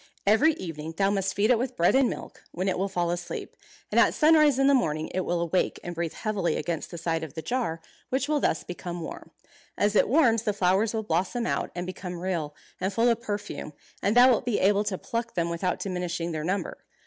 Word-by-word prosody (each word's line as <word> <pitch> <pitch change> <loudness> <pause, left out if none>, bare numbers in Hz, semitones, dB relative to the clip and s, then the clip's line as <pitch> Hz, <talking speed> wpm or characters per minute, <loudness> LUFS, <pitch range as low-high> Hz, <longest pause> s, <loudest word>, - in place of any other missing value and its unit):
Every 225 +11 +5
evening 165 - -7
thou 195 0 +3
must 195 -1 -1
feed 210 +4 +3
it 235 - +4
with 255 +1 -3
bread 170 - +4
and 265 -1 +4
milk, - - -8
when 185 +3 -2
it 185 - 0
will 195 +1 0
fall 175 -2 0
asleep; 175 0 -5 0.4
and - - +4
at - - +4
sunrise 305 -3 +5
in 270 - +3
the 280 - +5
morning 155 - 0
it 185 - 0
will 175 0 0
awake 170 +2 0
and 175 - -5
breathe 170 -1 -3
heavily 205 -5 -1
against 170 -2 -3
the 170 - -7
side 165 -1 -1
of 155 - -8
the 160 - -5
jar, 230 -11 -2 0.3
which 265 +2 0
will 300 -1 +1
thus 160 - 0
become 175 -1 -6
warm. 160 - -8 0.5
As 205 +1 +1
it - - +4
warms 240 -5 +4
the 215 -3 -1
flowers 200 +3 +2
will 220 - -1
blossom 190 +6 -1
out, - - -1
and 175 0 -3
become 180 -1 -6
real, 170 -5 -3 0.2
and 190 - -1
full 230 +4 +3
of 235 0 +1
perfume, 205 -8 -5 0.3
and 205 +4 +1
thou 250 +1 +9
wilt 230 - +2
be 245 -4 0
able 200 +2 +3
to 200 -3 -1
pluck 230 +3 -4
them 170 -1 0
without 180 +2 -1
diminishing 180 -3 -3
their 155 -1 -3
number. 190 +5 -2
190 Hz, 230 wpm, -27 LUFS, 170-230 Hz, 0.5 s, thou